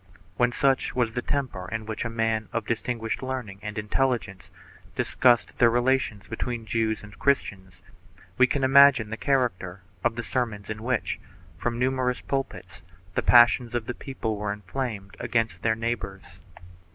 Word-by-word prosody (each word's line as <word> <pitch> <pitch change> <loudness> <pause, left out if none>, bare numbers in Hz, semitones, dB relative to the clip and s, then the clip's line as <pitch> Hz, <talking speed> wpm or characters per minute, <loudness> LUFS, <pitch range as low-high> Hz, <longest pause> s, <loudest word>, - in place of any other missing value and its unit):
2 90 - -23 0.2
When 120 0 +3
such 135 +1 +1
was 120 -3 +1
the 125 +2 -2
temper 125 -11 -3
in 110 -1 -3
which 110 0 -4
a 115 - -2
man 115 -1 -1
of 115 -2 -2
distinguished 115 0 -2
learning 130 -7 -5
and 105 0 -6
intelligence 105 -3 -1 0.5
discussed 125 -2 +2
the 120 - +6
relations 120 -3 +1
between 115 0 -4
Jews 110 0 -1
and 105 -1 -13
Christians, 95 -9 -1 0.5
we 130 - +5
can 135 +1 -1
imagine 135 -5 +6
the - - -2
character 115 -9 -1 0.2
of 115 - +1
the 120 - -3
sermons 110 -6 -2
in 110 0 -6
which, 120 0 -1 0.4
from 120 +7 -2
numerous 125 0 0
pulpits, 90 -11 -4 0.3
the - - +1
passions 120 0 +5
of 120 -2 -1
the 125 - -3
people 120 -5 -4
were 105 0 -2
inflamed 105 0 -5
against 115 -1 -1
their 110 -1 +2
neighbors. 110 -4 -5
115 Hz, 160 wpm, -26 LUFS, 105-125 Hz, 0.5 s, the